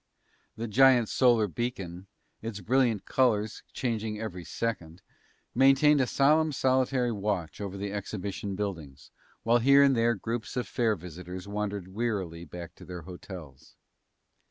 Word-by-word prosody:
The 115 +1 -4
giant 125 0 +5
solar 120 -5 +4
beacon, 95 - -5 0.3
its 110 -2 -5
brilliant 120 +1 +1
colors 110 -5 +1
changing 110 -3 -2
every 90 -5 -5
second, 85 -5 -4 0.5
maintained 135 +3 +5
a 130 - +1
solemn 155 +4 +3
solitary 130 -2 +1
watch 100 -7 -3
over 100 -1 -5
the 100 0 -4
exhibition 100 -1 -4
buildings, 80 -9 -6 0.3
while 120 +1 +4
here 140 +3 +6
and 135 -1 +4
there 115 0 +2
groups 115 +4 -4
of 125 - -1
fair 115 -3 +1
visitors 90 +2 -8
wandered 100 -2 -3
wearily 95 -6 -3
back 85 +1 -9
to - - -12
their 90 -2 -7
hotels. 85 -5 -11
105 Hz, 135 wpm, -28 LUFS, 90-120 Hz, 0.5 s, here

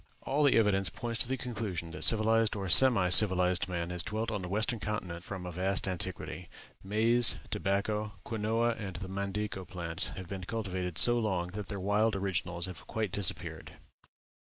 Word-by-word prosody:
All 145 +3 0
the 140 - +4
evidence 100 -4 +3
points 115 +5 -5
to - - +1
the 130 +1 -2
conclusion 105 -9 -4
that - - -5
civilized 110 0 +3
or 100 -2 -4
semi 105 -3 +6
civilized 90 -1 +5
man 85 -1 -3
has 90 -1 +2
dwelt 110 +5 -3
on 105 -2 -3
the 90 - -5
western 110 +4 -1
continent 90 -5 -4
from 95 -2 -7
a 90 - -5
vast 95 +3 -1
antiquity. 95 0 -5 0.3
Maize, 115 +4 +4 0.2
tobacco, 105 +2 -1
quinoa, 115 +1 0
and 95 -4 -6
the 95 +2 -6
mandico 100 +1 -4
plants 85 -2 -3
have 95 -2 -7
been 95 0 -6
cultivated 95 -6 -4
so 120 +4 +4
long 95 -6 -1
that 100 +1 -7
their 100 - -5
wild 105 +3 +1
originals 90 -3 -2
have 90 -1 -10
quite 110 -4 -3
disappeared. 90 -5 0
100 Hz, 175 wpm, -31 LUFS, 90-110 Hz, 0.3 s, semi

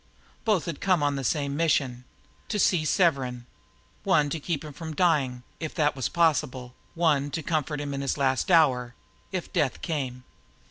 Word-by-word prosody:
Both 210 -7 +2
had 165 -5 -5
come 185 -6 +2
on 145 -1 +1
the 135 - -3
same 140 +1 0
mission 135 -6 +1 0.4
to 210 - -2
see 180 -5 +3
Severn; 135 -9 +1 0.6
one 145 -1 +3
to 165 - -2
keep 155 0 -3
him 150 - -8
from 160 +1 -7
dying, 140 -8 +1 0.2
if 160 -2 -5
that 150 -3 +2
was 130 -2 -2
possible, 130 -7 +1 0.2
one 150 -4 +2
to 160 +2 -4
comfort 150 -1 -1
him 145 -1 -4
in 135 - -3
the 135 - 0
last 135 +5 +1
hour, 130 -8 +3 0.4
if 185 -3 -4
death 135 -4 0
came. 130 -6 -3
145 Hz, 175 wpm, -27 LUFS, 130-165 Hz, 0.6 s, see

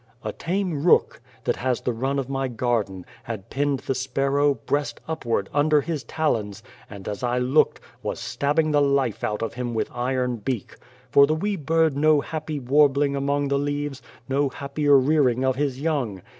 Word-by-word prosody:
"A - - -2
tame 175 -4 -2
rook, 175 - +3 0.2
that - - 0
has 125 -1 -1
the 125 - -1
run 135 +4 -1
of 135 -3 -2
my 135 -1 -1
garden, 115 -6 -1 0.2
had 110 -4 -7
pinned 140 -1 0
the - - -1
sparrow, 135 +2 +1
breast 145 +1 -2
upward, 115 -11 -1
under 150 +1 +3
his 150 -1 -3
talons, 110 -11 -2 0.3
and, 100 -1 -10
as 105 +3 -4
I 125 0 0
looked, 125 +4 +2 0.2
was - - -4
stabbing 155 +2 0
the 145 -1 +3
life 140 -5 +1
out 105 +1 -1
of 115 - -3
him 120 -1 -4
with 110 - -1
iron 125 0 -1
beak. 115 0 -4 0.4
For 140 0 +7
the 155 - +1
wee 205 +6 -1
bird 160 -2 +1
no 155 +1 +4
happy 155 0 -4
warbling 140 +1 +3
among 140 +1 0
the 140 0 +1
leaves; 145 -1 -3 0.3
no 140 +1 +1
happier 140 +1 +2
rearing 130 -2 +3
of 130 -1 +2
his 135 -2 -1
young. 135 - -2
140 Hz, 180 wpm, -24 LUFS, 125-145 Hz, 0.4 s, For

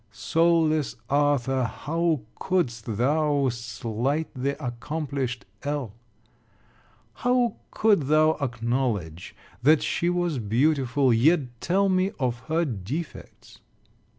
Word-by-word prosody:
Soul 165 +8 +2
less 155 -2 -1 0.2
Arthur, 140 -2 +2
how 160 +6 -1 0.2
couldst 120 - -1
thou 145 +2 +2
slight 120 +6 -2
the 140 +1 -2
accomplished 130 -1 -4 0.2
L? 140 -7 -3 1.2
How 245 - +1
could 205 -11 +2
thou 155 +1 +5
acknowledge 115 - -2 0.3
that 150 +4 +4
she 170 - 0
was 175 -5 0
beautiful, 130 +3 +2
yet 150 +9 +4 0.2
tell 195 +3 +2
me 185 0 +2
of 125 -3 -1
her 165 +2 +1
defects? 130 - -7
140 Hz, 100 wpm, -25 LUFS, 120-160 Hz, 1.2 s, thou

